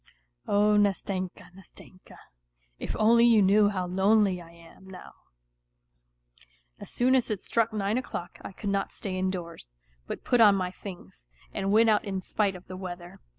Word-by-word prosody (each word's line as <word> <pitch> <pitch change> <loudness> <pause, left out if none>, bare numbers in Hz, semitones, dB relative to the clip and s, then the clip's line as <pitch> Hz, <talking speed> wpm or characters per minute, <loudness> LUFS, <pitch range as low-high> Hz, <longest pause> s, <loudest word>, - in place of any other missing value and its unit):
Oh, 210 +1 +3
Nastenka, 195 -3 -2
Nastenka! 185 0 -15 0.6
If - - -5
only 230 +2 +4
you 235 -2 +5
knew 205 +1 +4
how 185 -3 -3
lonely 190 0 +2
I 165 - -14
am 170 +3 -17
now! 185 -1 -12 1.7
As - - -10
soon 250 +2 +1
as 255 -3 +2
it 210 -3 -2
struck 230 +3 0
nine 210 +2 -1
o'clock 180 -8 -7
I - - -8
could 200 +1 -5
not 195 0 -2
stay 190 -3 -5
indoors, 175 - -5 0.3
but - - -6
put 245 -2 +2
on 205 -3 +7
my 185 -2 -2
things, 180 - -12 0.3
and 195 0 -2
went 220 +1 +5
out 210 - +2
in 195 -2 -3
spite 195 +1 -1
of 180 - -12
the 185 - -9
weather. 175 -2 -8
195 Hz, 165 wpm, -27 LUFS, 185-210 Hz, 1.7 s, on